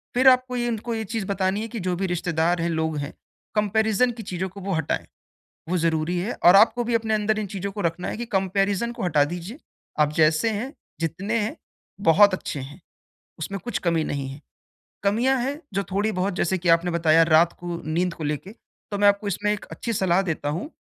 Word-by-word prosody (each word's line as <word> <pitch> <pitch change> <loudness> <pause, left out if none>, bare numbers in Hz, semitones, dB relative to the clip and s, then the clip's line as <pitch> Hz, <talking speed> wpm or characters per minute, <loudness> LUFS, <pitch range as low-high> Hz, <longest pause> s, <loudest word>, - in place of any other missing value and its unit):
फिर 260 +2 +4
आपको 255 0 +2
ये 240 0 0
उनको 230 +1 -3
ये 220 - -2
चीज़ 220 -3 -1
बतानी 195 +1 0
है 225 - -3
कि 230 0 -6
जो 180 -1 -1
भी 190 +2 -2
रिश्तेदार 175 -1 0
हैं, 170 - 0
लोग 160 -1 -1
हैं, 145 +1 -4 0.4
कंपैरिज़न 220 +3 +2
की 230 -1 -8
चीज़ों 190 -1 -3
को 195 +2 -11
वो 195 +1 -2
हटाएँ, 160 -3 -1 0.6
वो 180 - +1
ज़रूरी 165 +1 0
है 200 +7 -2
और 175 +2 +9
आपको 240 +4 +5
भी 235 0 -1
अपने 220 -1 +1
अंदर 215 0 +1
इन 215 - -2
चीज़ों 195 +1 -3
को 205 - -6
रखना 170 0 -1
है - - -3
कि 240 +2 -5
कंपैरिज़न 195 +2 0
को - - -7
हटा 150 -5 +3
दीजिए, 180 - -6 0.4
आप 150 0 +3
जैसे 155 +7 +3
हैं, 225 +6 -3 0.3
जितने 190 +8 -1
हैं, 210 +1 -3 0.5
बहुत 200 +3 +6
अच्छे 150 -5 -4
हैं, 140 +6 -9 0.6
उसमें 195 +5 -4
कुछ 240 - -2
कमी 165 -2 +1
नहीं 140 -3 -3
है। 135 +2 -9 0.6
कमियाँ 235 +7 +2
है, 280 +5 -3
जो 200 +1 0
थोड़ी 205 +3 +1
बहुत 190 0 -1
जैसे 185 +1 +1
कि 175 -1 -1
आपने 170 +1 +4
बताया 165 -1 +4
रात 165 +1 +4
को 175 -1 -5
नींद 170 +3 0
को 165 - -8
लेके 150 +6 -3 0.4
तो 205 - -2
मैं 205 - +5
आपको 200 +1 +2
इसमें 205 +2 0
एक 210 - -6
अच्छी 230 - -4
सलाह 190 -2 +2
देता 160 -6 -2
हूँ, 170 - -3
190 Hz, 215 wpm, -24 LUFS, 165-215 Hz, 0.6 s, और